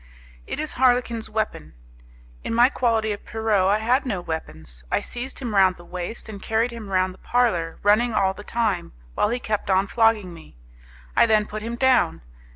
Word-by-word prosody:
It - - -4
is 310 -1 -3
Harlequin's 245 -3 +1
weapon. 210 - -3 0.7
In 230 - -2
my 240 +2 +6
quality 225 -5 +1
of 205 - -5
Pierrot 220 -4 +1
I 205 +2 +3
had 245 +5 +1
no 215 -8 -2
weapons. 80 - -7
I - - +1
seized 250 +2 -6
him 240 -5 -4
round 190 -2 +4
the 175 - -15
waist 180 +7 -5
and 205 -3 -8
carried 225 +4 0
him 230 -4 -8
round 185 -1 +1
the 185 - -19
parlour, 215 -10 0
running 215 +4 +4
all 195 -3 +2
the 205 - -11
time, 215 - -1 0.2
while 210 - +1
he 240 - 0
kept 215 -5 -3
on 190 +1 +3
flogging 220 -4 +2
me. 160 - -15 0.6
I - - +5
then 215 -1 +3
put 215 0 -6
him 230 +2 -4
down. 250 - +2
215 Hz, 190 wpm, -23 LUFS, 185-235 Hz, 0.7 s, my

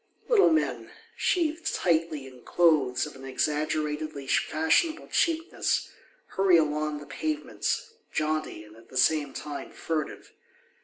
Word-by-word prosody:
Little 450 -5 +6
men, 315 -1 0 0.3
sheathed 330 -2 0
tightly 165 -4 0
in 130 -2 -13
clothes 150 -8 +3
of 150 - -10
an 135 - -12
exaggeratedly 150 +1 -1
fashionable 160 - +1
cheapness, 330 0 0 0.4
hurry 190 -2 +4
along 150 -1 0
the 145 - -9
pavements, 315 - -3 0.2
jaunty 155 -7 -2
and 105 0 -16
at 115 0 -18
the 130 - -6
same 150 +1 +3
time 145 +1 -6
furtive. 155 -2 -4
155 Hz, 120 wpm, -27 LUFS, 145-190 Hz, 0.4 s, Little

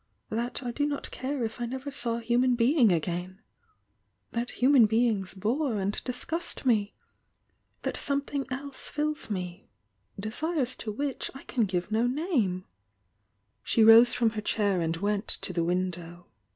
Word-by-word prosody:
Ihat 235 +4 -2
I 245 - -2
do 290 +4 0
not 285 -1 -4
care 265 0 -3
if 225 +2 -4
I 240 - -1
never 265 +3 -5
saw 240 -4 -1
a - - -5
human 245 +2 +2
bemg 250 +1 +4
a^. 180 +2 -4 0.9
That 235 +1 -2
human 255 -3 +5
beings 220 -4 +1
bore 235 +6 0
and 195 +1 -1
disgust 300 +6 -2
me? 210 -5 +2 0.9
That - - -2
something 280 -1 -2
else 275 +1 -4
fiUs 300 -2 -2
me,— 180 -2 -5 0.5
desir?s 260 - -1
to 215 - -4
which 275 +5 -3
I 270 - -10
can 235 -5 0
give 180 -1 -2
""sh^^ose 185 - +2
from 230 -2 +2
her 215 -1 -4
chair 205 -4 +1
and 165 0 -1
went 205 +3 -1
to 185 - +1
the 170 -1 0
window. 175 0 -3
230 Hz, 145 wpm, -28 LUFS, 185-260 Hz, 0.9 s, human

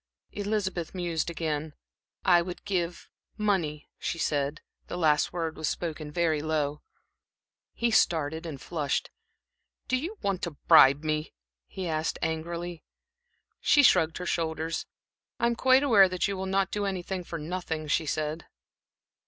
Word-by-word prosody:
Elizabeth 200 -5 -2
mused 170 -3 -1
again. 155 -2 -3 0.5
"I 175 -2 +6
would 175 +1 -7
give 180 -4 -2 0.3
money," 175 -8 0
she - - -2
said. 145 -2 -1 0.3
The - - -5
last 155 -4 +3
word 165 -2 -3
was 155 - -1
spoken 155 -3 -4
very 160 -2 +1
low. 150 -1 -1 0.9
He 235 0 0
started 160 -5 +2
and 145 -4 -6
flushed. 150 -2 -2 0.8
"Do 255 - +2
you 335 +12 -3
want 195 -2 0
to 165 -5 -4
bribe 140 +3 +7
me?" 155 - -2 0.3
he 190 -2 -5
asked, 155 0 -1
angrily. 170 +1 -3 0.8
She 290 - +5
shrugged 165 - +4
her 180 - -5
shoulders. 165 -1 -2 0.5
"I - - +2
am 235 0 +2
quite 260 +3 +5
aware 205 -9 +6
that 185 +1 0
you 200 - -2
will 190 0 -4
not 195 0 +1
do 205 -1 -1
anything 190 -1 -3
for 170 - -6
nothing," 160 -1 -4
she 155 +1 +1
said. 155 +2 -2
170 Hz, 145 wpm, -28 LUFS, 155-190 Hz, 0.9 s, bribe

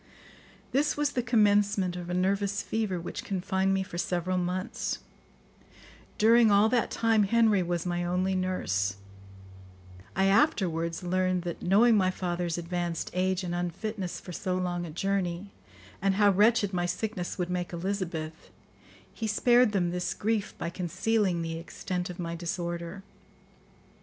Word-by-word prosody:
This 290 +3 +1
was 295 -1 +1
the 250 - 0
commencement 205 -5 +2
of 175 -1 -6
a 180 - -1
nervous 200 +2 0
fever 215 -5 -1
which 170 - -6
confined 190 0 0
me 195 0 +1
for 175 -2 -7
several 180 +1 0
months. 180 +2 -2 1.2
During 230 +1 +6
all 205 +2 +5
that 240 -1 +1
time 225 -2 +2
Henry 220 -2 +3
was 175 -1 -2
my 175 0 -1
only 180 +2 0
nurse. 100 - -1 1.2
I 190 - +3
afterwards 180 - +2
learned 185 0 0
that, 175 -2 -5
knowing 215 +5 +5
my 185 -2 +3
father's 175 -2 -2
advanced 175 -1 -3
age 185 +1 0
and 175 -1 -3
unfitness 180 +2 -3
for 180 - -10
so 180 +1 -2
long 175 -1 -2
a - - -8
journey, 190 +2 -2 0.5
and 195 0 +2
how 205 0 +5
wretched 205 0 +3
my 175 -1 0
sickness 190 0 -3
would 180 -1 -2
make 180 -1 -2
Elizabeth, 170 -3 -4 0.6
he 225 - -3
spared 240 +2 +4
them 180 -4 +1
this 180 0 -2
grief 215 -1 -1
by 170 - -4
concealing 185 +1 0
the 165 0 -4
extent 180 +1 -4
of 180 - -7
my 170 -2 -4
disorder. 170 +1 -4
185 Hz, 145 wpm, -28 LUFS, 175-205 Hz, 1.2 s, During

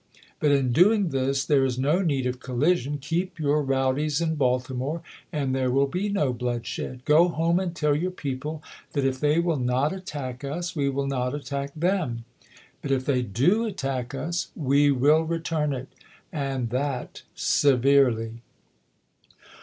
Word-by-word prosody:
But 150 - +3
in 135 -3 +2
doing 195 - +4
this, 135 0 0
there 140 -3 +3
is 130 -2 0
no 150 +8 +2
need 140 -8 0
of 125 0 -2
collision. 145 +3 0
Keep 165 +7 -3
your 150 0 +2
rowdies 135 +2 0
in 165 -1 0
Baltimore, 130 +3 -1 0.3
and 140 -5 -1
there 130 -1 +1
wiR 135 +2 +3
be 180 +9 -2
no 150 -11 +1
bloodshed. 125 +1 -4
Go 160 +4 +5
home 170 +1 +1
and 180 -2 -3
tell 150 -3 +2
your 175 +5 0
people 150 -2 -5 0.3
that 140 -2 0
if 130 -1 0
they 150 +2 +2
will 170 -3 +1
not 125 +6 +1
attack 145 -8 -6
us, 170 +6 -4
we 140 -3 +1
will 140 +1 -1
not 130 -1 -1
attack 140 -1 -4
them; 160 -9 -1 0.6
but 140 - -5
if 130 -1 +1
they 130 -3 +2
do 135 - +2
attack 135 - -3
us, 170 +6 -3
we 145 -1 +3
will 145 +4 +4
return 160 -2 -1
it, 130 -1 -4 0.5
and 135 -6 -2
that 130 0 -3
severely. 125 -4 +3
140 Hz, 160 wpm, -25 LUFS, 130-160 Hz, 0.6 s, Go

